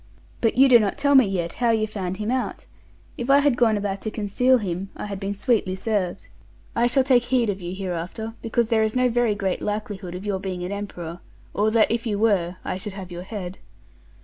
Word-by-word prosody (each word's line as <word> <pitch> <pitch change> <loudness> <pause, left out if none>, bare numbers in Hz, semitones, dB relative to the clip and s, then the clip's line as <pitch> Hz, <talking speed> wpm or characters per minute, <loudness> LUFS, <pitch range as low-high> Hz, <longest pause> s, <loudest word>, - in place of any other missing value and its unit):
But 225 0 +1
you 270 +1 +7
do 245 -3 +8
not 205 -3 -1
tell 285 0 +3
me 260 -5 +7
yet 175 -3 -2
how 240 - +3
you 220 -1 +2
found 190 -4 -4
him 215 +2 -2
out. 255 0 -2 0.5
If 240 +2 -3
I 275 - +7
had 285 -3 +3
gone 225 -3 +3
about 200 -1 -3
to 220 - -3
conceal 225 +5 +2
him, 190 -3 -4
I - - -6
had 200 -2 -5
been 200 0 -3
sweetly 200 -3 +1
serv'd. 195 -2 -2 0.5
I 235 +1 +3
shall 265 +2 +3
take 250 -2 +3
heed 245 -4 +2
of 195 -1 -7
you 175 +1 -5
hereafter; 190 +4 -4
because 230 0 0
there 225 -2 +3
is 220 +1 0
no 255 0 +3
very 235 -3 +2
great 195 -2 -2
likelihood 205 -3 -4
of 185 +3 -7
your 200 -2 -1
being 185 -2 -4
an 180 - -4
emperor, 175 -4 -6 0.3
or 210 +1 +2
that, 220 0 +3
if 230 +1 -1
you 210 -2 0
were, 195 -5 +2
I - - -2
should 205 +1 -6
have 190 -2 -8
your 175 0 -6
head. 185 -1 -6
210 Hz, 230 wpm, -24 LUFS, 190-235 Hz, 0.5 s, do